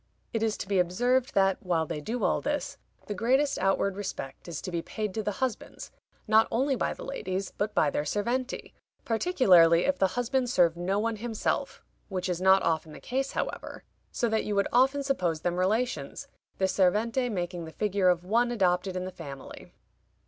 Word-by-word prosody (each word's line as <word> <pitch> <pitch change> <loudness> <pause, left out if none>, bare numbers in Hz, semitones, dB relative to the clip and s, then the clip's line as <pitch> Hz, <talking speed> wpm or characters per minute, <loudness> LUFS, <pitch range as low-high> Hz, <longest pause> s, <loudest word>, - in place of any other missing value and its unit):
It 225 - -1
is 220 -1 0
to - - -6
be 195 -1 +2
observed, 245 +9 +1
that 195 -1 +3
while 170 -3 0
they 155 -2 -5
do 225 +8 -3
all - - +2
this, 295 0 -3 0.3
the 210 - -4
greatest 260 +8 +1
outward 195 +1 +1
respect 190 -9 -6
is 170 -3 -5
to 185 - -5
be 170 -1 -1
paid 210 +2 -4
to 220 - -2
the 210 -1 -2
husbands, 255 +1 -4 0.4
not 220 +1 +5
only 265 +4 +1
by - - -1
the - - -9
ladies, 190 -8 -4
but 210 +1 -2
by 145 - +3
their - - 0
serventi, 240 - -2 0.3
particularly 190 - +4
if 280 0 0
the 190 - +4
husband 250 +1 0
serve 175 -8 +3
no 180 +3 -1
one 225 +1 -1
himself 225 0 -2 0.3
(which 185 -1 -3
is 180 0 -2
not 190 +1 +5
often 160 -1 -1
the - - -10
case, 265 +2 -2
however), - - -4 0.3
so 240 - 0
that 220 -1 0
you 210 - -2
would 200 0 +2
often 270 +3 +3
suppose 180 - -1
them 175 +1 -1
relations, 220 +7 -1 0.3
the 190 - +2
servente 220 +7 +1
making 175 -3 -3
the 160 - -9
figure 200 0 +1
of 175 -1 +1
one 235 +6 +2
adopted 185 -4 +1
in 185 0 -2
the 185 - -5
family. 140 -6 -10
200 Hz, 190 wpm, -28 LUFS, 180-240 Hz, 0.4 s, not